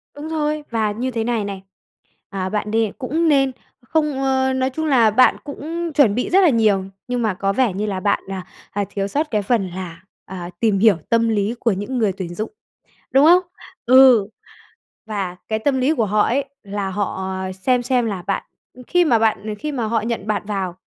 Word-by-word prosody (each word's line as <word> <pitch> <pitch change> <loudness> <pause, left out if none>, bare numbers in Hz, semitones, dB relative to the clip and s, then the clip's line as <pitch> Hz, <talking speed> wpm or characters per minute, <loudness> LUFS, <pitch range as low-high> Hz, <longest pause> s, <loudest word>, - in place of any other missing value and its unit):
Đúng 290 +2 -7
rồi! 305 -1 -1
Và 220 -2 0
như 250 +5 -3
thế 225 -1 -2
này 230 -2 -1
này, 195 -1 -5 0.7
à, 190 -1 -3
bạn 210 0 -2
đê 225 -2 +1
cũng 310 +5 0
nên 275 -3 +3 0.3
không 295 +1 -1
ơ, 265 0 +1
nói 260 0 0
chung 315 +4 -4
là 240 -6 +5
bạn 255 +4 +5
cũng 330 +4 -5
chuẩn 265 -9 +4
bị 250 - -1
rất 385 +2 +5
là 345 - +6
nhiều, 215 -6 +2 0.2
nhưng 245 -1 -1
mà 215 -4 +1
có 195 +2 -1
vẻ 240 -4 +1
như 205 +3 -2
là 195 -3 -2
bạn, 200 +2 +1
à, 190 -2 -5 0.3
à, 205 0 -1
thiếu 195 -1 -2
sót 300 +7 -2
cái 210 -2 +1
phần 205 -1 0
là, 175 -2 -7 0.2
à, 180 -2 -7
tìm 215 -4 +2
hiểu 215 -2 +5
tâm 230 0 +3
lý 215 +1 0
của 230 - +2
những 205 +7 -3
người 215 -4 +2
tuyển 180 -3 -6
dụng, 215 +3 -4 0.6
đúng 270 +2 +5
không? 350 +3 +7 0.4
Ừ, 255 -4 +7 0.8
và 195 -5 -3
cái 220 0 0
tâm 265 +3 0
lý 285 +5 +2
của 225 -5 +1
họ 210 +1 +1
ấy, 275 +3 +1 0.2
là 200 -1 -4
họ, 190 -1 -3
à, 190 0 -4
xem 245 +7 0
xem 245 -1 +1
là 195 -5 -3
bạn, 195 - -1 0.3
ừm, 250 0 -13
khi 355 +5 +2
mà 245 -8 +3
bạn 220 -1 +2
ờ, 210 - -2
khi 300 +4 -4
mà 245 -4 -2
họ 225 +1 0
nhận 225 -2 -3
bạn 210 -1 -1
vào 190 -4 -3
225 Hz, 220 wpm, -20 LUFS, 200-265 Hz, 0.8 s, không